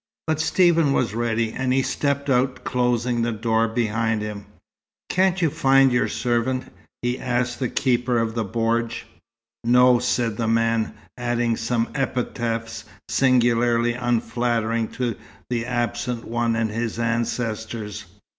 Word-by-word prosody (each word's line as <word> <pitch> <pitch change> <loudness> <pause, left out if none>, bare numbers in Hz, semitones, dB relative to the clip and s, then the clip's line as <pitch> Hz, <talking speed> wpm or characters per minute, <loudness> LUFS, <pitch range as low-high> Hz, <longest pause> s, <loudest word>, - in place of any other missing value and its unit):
But 155 -1 0
Stephen 165 -4 +3
was 115 -7 0
ready, 115 -1 0
and 130 -1 -1
he 135 +1 +2
stepped 140 +1 -1
out, 130 -1 +1
closing 125 -1 0
the 120 0 0
door 115 +1 +1
behind 115 -1 0
him. 105 -1 -6 0.6
"Can't 185 0 +2
you 160 - +2
find 135 -1 +4
your 120 0 +2
servant?" 125 +1 -1 0.3
he 120 +1 -1
asked 125 -1 -1
the 125 -3 -1
keeper 125 -2 +1
of 115 -1 0
the 115 -1 -1
bordj. 115 +2 -1 0.6
"No," 125 +1 +5
said 120 -3 0
the 115 - -1
man, 115 0 +1 0.2
adding 120 -1 0
some 115 +1 -1
epithets 115 -4 -2 0.3
singularly 120 -2 +3
unflattering 115 -1 0
to 120 -4 -2 0.3
the 120 -1 -1
absent 120 -1 -2
one 115 0 0
and 115 -1 0
his 115 0 -3
ancestors. 115 -2 -2
120 Hz, 135 wpm, -23 LUFS, 115-125 Hz, 0.6 s, No